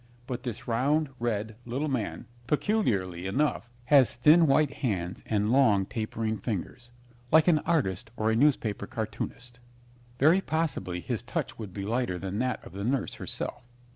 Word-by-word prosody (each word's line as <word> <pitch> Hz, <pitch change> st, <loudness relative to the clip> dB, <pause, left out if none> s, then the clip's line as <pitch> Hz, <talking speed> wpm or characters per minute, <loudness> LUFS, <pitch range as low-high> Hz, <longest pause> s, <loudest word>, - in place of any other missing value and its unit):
But 125 Hz, -1 st, -4 dB
this 125 Hz, -1 st, -6 dB
round, 140 Hz, +6 st, +1 dB
red, 110 Hz, -2 st, -2 dB
little 130 Hz, +6 st, -2 dB
man, 110 Hz, -, -2 dB, 0.2 s
peculiarly 100 Hz, -, 0 dB
enough, 135 Hz, +4 st, 0 dB, 0.2 s
has 135 Hz, -1 st, +5 dB
thin 155 Hz, +7 st, +6 dB
white 145 Hz, +1 st, +3 dB
hands 95 Hz, -, -2 dB
and 105 Hz, 0 st, +1 dB
long 110 Hz, -8 st, +4 dB
tapering 110 Hz, 0 st, -3 dB
fingers, 120 Hz, +3 st, -5 dB, 0.4 s
like 160 Hz, +1 st, +6 dB
an 165 Hz, -3 st, +5 dB
artist 110 Hz, -, 0 dB
or 110 Hz, +1 st, +1 dB
a -, -, +2 dB
newspaper 115 Hz, -6 st, +2 dB
cartoonist. 120 Hz, +2 st, -5 dB, 0.6 s
Very 160 Hz, +8 st, +5 dB
possibly 155 Hz, -, -2 dB
his -, -, -3 dB
touch -, -, -4 dB
would 105 Hz, -4 st, -6 dB
be 100 Hz, +1 st, -5 dB
lighter 115 Hz, -4 st, -1 dB
than 95 Hz, +3 st, -4 dB
that 125 Hz, 0 st, -1 dB
of -, -, -10 dB
the 100 Hz, +1 st, -5 dB
nurse 130 Hz, +3 st, 0 dB
herself. -, -, -4 dB
120 Hz, 155 wpm, -28 LUFS, 105-140 Hz, 0.6 s, thin